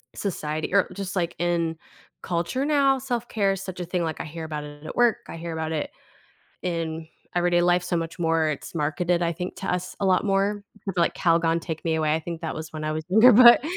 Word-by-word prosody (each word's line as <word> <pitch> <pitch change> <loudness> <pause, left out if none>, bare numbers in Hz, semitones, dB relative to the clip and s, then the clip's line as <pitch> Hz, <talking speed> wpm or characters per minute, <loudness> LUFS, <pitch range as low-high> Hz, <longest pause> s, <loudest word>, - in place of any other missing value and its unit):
society 155 -4 -3
or 200 - +4
just, 195 -1 -5
like, 170 -2 -1
in 170 -2 0 0.5
culture 175 +10 -1
now, 280 -3 +3
self-care 235 -6 -1
is 195 - -5
such 185 -1 -7
a 175 - -3
thing, 180 0 -1
like, 160 -1 -3
I - - -4
hear 160 +1 -7
about 150 -2 -4
it 145 +1 -11
at - - -6
work, 240 -2 +4
I - - -7
hear 165 0 -5
about 160 0 -3
it 155 -2 -2 0.7
in 165 -2 -3 0.3
everyday 175 0 +3
life 175 0 +3
so 175 - -1
much 165 +1 -4
more, 165 -1 +2
it's 150 - -5
marketed, 170 +3 0
I 170 0 +1
think, 180 +3 -5
to 190 - -3
us 180 0 -3
a 195 - +1
lot 185 +2 +3
more, 200 +1 +1 0.3
like, 170 - +2
Calgon 165 -1 +2
Take 160 -1 -6
Me 160 -1 +1
Away, 155 -1 +1
I 160 - 0
think 165 0 -6
that 160 - -3
was 155 0 -7
when 155 -1 -5
I 155 - -1
was 155 0 -4
younger, 220 +6 +7
but 240 +2 +9
170 Hz, 225 wpm, -25 LUFS, 160-195 Hz, 0.7 s, but